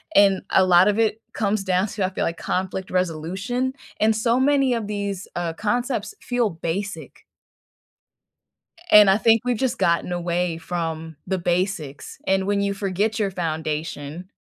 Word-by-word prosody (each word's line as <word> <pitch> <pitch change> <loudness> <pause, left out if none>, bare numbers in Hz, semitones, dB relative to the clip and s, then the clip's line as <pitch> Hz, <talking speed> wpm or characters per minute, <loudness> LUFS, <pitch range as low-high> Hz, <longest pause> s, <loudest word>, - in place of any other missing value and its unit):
and 195 -2 +5
a 190 - +5
lot 180 +1 +6
of 210 +2 +2
it 220 0 +1
comes 210 -2 0
down 185 +2 +1
to, 200 -2 -2
I - - -1
feel 190 - -3
like 165 0 -2
conflict 185 0 -3
resolution, 185 +9 -1 0.3
and 220 0 +3
so 230 +3 +2
many 275 -2 +3
of 230 -3 -2
these, 200 -2 -4
uh, 170 -2 -2
concepts 220 +2 -2
feel 245 -3 0
basic 175 +5 -5 1.7
and 210 -2 +9
I 195 - +5
think 225 0 +4
we've 245 -2 0
just 260 0 -1
gotten 175 -1 +1
away 175 -1 -1
from 165 -2 -4
the 190 - -1
basics, 175 -5 -2
and 190 0 +2
when 200 0 +1
you 200 0 0
forget 200 +3 -1
your 200 -3 0
foundation, 160 0 -4
195 Hz, 160 wpm, -23 LUFS, 175-215 Hz, 1.7 s, and